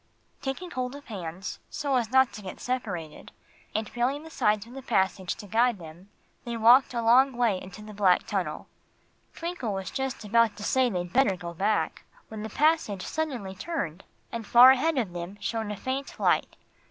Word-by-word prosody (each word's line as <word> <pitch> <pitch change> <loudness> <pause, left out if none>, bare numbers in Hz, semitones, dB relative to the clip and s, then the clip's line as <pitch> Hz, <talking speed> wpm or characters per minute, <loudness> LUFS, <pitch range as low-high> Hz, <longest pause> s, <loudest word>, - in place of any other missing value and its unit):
Taking 310 +7 -4
hold 255 -1 -3
of 285 0 -11
hands, 185 -4 -6
so 285 -2 -1
as 235 -3 +1
not 265 -2 +4
to 210 - -8
get 190 -2 -8
separated, 190 -12 -4 0.4
and 220 0 -1
feeling 260 +5 -1
the 320 - -11
sides 210 -7 +1
of 235 - -13
the 270 - -7
passage 190 -6 0
to - - -10
guide 230 +3 +2
them, 170 +3 -12 0.3
they 235 -1 -4
walked 245 +3 +6
a 235 - -1
long 260 +4 +5
way 235 -6 +1
into 195 +3 -10
the 215 0 -10
black 195 -3 +3
tunnel. 185 -8 -3 0.7
Twinkle 335 - -3
was 190 -1 -4
just 265 -4 -3
about 225 0 +3
to 205 - -7
say 260 +4 +2
they'd 175 -4 -4
better 250 -7 +4
go 170 -1 -7
back, 200 +5 0 0.3
when 220 -1 -7
the 220 - -5
passage 290 - +1
suddenly 255 -12 -3
turned, 190 - -4 0.3
and 230 -3 -5
far 245 +4 +9
ahead 290 +4 +1
of 215 -9 -1
them 175 +3 -6
shone 225 -2 -3
a 210 - -4
faint 265 +5 -4
light. - - +2
225 Hz, 190 wpm, -27 LUFS, 195-260 Hz, 0.7 s, far